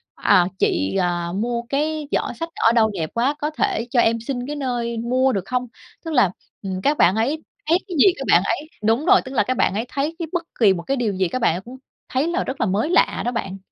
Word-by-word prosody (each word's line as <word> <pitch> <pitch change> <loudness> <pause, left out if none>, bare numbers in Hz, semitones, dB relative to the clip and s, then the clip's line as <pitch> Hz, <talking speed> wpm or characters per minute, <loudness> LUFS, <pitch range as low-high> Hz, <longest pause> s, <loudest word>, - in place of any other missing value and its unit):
à, 175 -1 +4
"Chị, 95 +2 +1
ờ, 175 -1 -1
mua 235 +3 -1
cái 300 +1 -1
giỏ - - -1
xách 330 0 -3
ở 225 - +3
đâu 225 -2 +3
đẹp 160 -5 -3
quá? 255 +5 +1
Có 300 - -1
thể 360 - -1
cho 250 - +2
em 230 0 +3
xin 245 +1 -4
cái 295 - -4
nơi 240 -4 -2
mua 255 +3 +1
được 195 -4 -2
không?" 250 +3 -2 0.4
Tức 325 - -4
là, 245 -10 +4 0.3
ừm, 190 -1 -4
các 290 +8 +1
bạn 185 - +4
ấy 275 +8 -1 0.3
thấy 335 - +5
cái 365 - -5
gì 375 +6 +6
các - - -4
bạn - - +6
ấy 305 - -2
đúng 225 +7 +2
rồi, 385 +1 +6
tức 260 - -7
là - - +3
các 255 -1 -2
bạn - - +2
ấy 220 +4 -2
thấy 290 +4 -2
cái 335 - -3
bất 350 -1 -1 0.2
kì 210 -5 +6
một 170 -2 -5
cái 275 +6 -1
điều 230 -5 0
gì 190 -1 0
các 255 +8 -4
bạn 165 - +3
ấy 180 - -5
cũng 245 +6 -11 0.3
thấy 265 +5 0
là 345 +2 0
rất 265 - -5
là 225 - +2
mới 205 +10 0
lạ 360 - +2
đó 245 - 0
bạn. 195 -5 -4
245 Hz, 265 wpm, -21 LUFS, 205-290 Hz, 0.4 s, gì